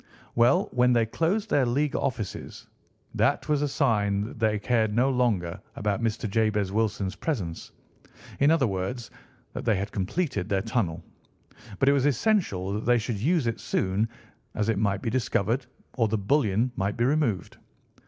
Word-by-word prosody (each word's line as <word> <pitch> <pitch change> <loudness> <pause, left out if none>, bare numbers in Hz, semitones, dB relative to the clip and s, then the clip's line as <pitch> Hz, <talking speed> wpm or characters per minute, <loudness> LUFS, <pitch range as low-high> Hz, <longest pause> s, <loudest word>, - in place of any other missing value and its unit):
"Well, 120 +1 +4
when 125 0 +3
they 115 -1 +3
closed 190 - -1
their 140 - +4
League 140 +4 0
offices 115 -7 -4 0.5
that - - +1
was 150 -2 +1
a 145 - +1
sign 100 -6 +1
that 110 +2 -6
they 110 -1 +2
cared 110 -1 +1
no 130 +3 +3
longer 105 -8 0
about 105 +2 -1
Mr. 115 -1 -1
Jabez 105 -2 +1
Wilson's 105 -2 -1
presence—in 125 - -4
other 160 -4 +4
words, 105 +4 -3 0.4
that - - -5
they 110 -3 +2
had 100 +2 -3
completed 105 - -2
their 95 -1 +1
tunnel. 110 -8 -1 0.7
But 135 - +1
it 140 - +6
was 140 0 +2
essential 125 - +1
that 105 - -3
they 120 0 +5
should 115 -2 -3
use 155 - +1
it 115 -1 -1
soon, 100 +4 0 0.5
as 105 0 0
it 110 -3 +1
might 100 -2 0
be 115 - -1
discovered, 120 0 0 0.3
or 115 -3 +2
the 110 +1 0
bullion 110 +1 +1
might 100 +3 -2
be 120 - +2
removed. 130 - 0
115 Hz, 165 wpm, -26 LUFS, 100-130 Hz, 0.7 s, it